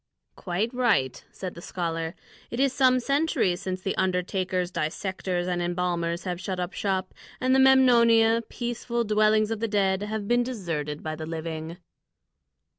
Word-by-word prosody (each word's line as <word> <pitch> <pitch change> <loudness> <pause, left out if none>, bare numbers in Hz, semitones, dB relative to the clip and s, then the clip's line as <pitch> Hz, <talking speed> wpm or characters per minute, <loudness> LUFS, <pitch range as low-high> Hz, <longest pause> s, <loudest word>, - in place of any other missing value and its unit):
"Quite 200 +7 -2
right," 225 - +1
said 185 -2 -6
the 170 - -10
scholar; 165 -2 -3 0.3
"it 235 - -5
is 270 -1 +3
some 255 -2 +4
centuries 275 - +1
since 185 -1 -4
the 195 - -2
undertakers, 185 0 0
dissectors, 175 +2 -2
and 180 -1 -1
embalmers 175 -1 -1
have 180 -1 -4
shut 185 -1 -3
up 180 +2 -3
shop, 190 -2 -2 0.3
and 255 0 +2
the 265 - +5
Memnonia, 235 -4 +5
peaceful 240 0 -2
dwellings 215 0 +3
of 225 - -2
the 230 - -1
dead, 195 -2 +1
have 210 0 -3
been 240 +2 +3
deserted 165 - -4
by 155 0 -3
the 155 0 -6
living." 165 0 -5
190 Hz, 155 wpm, -26 LUFS, 175-230 Hz, 0.3 s, the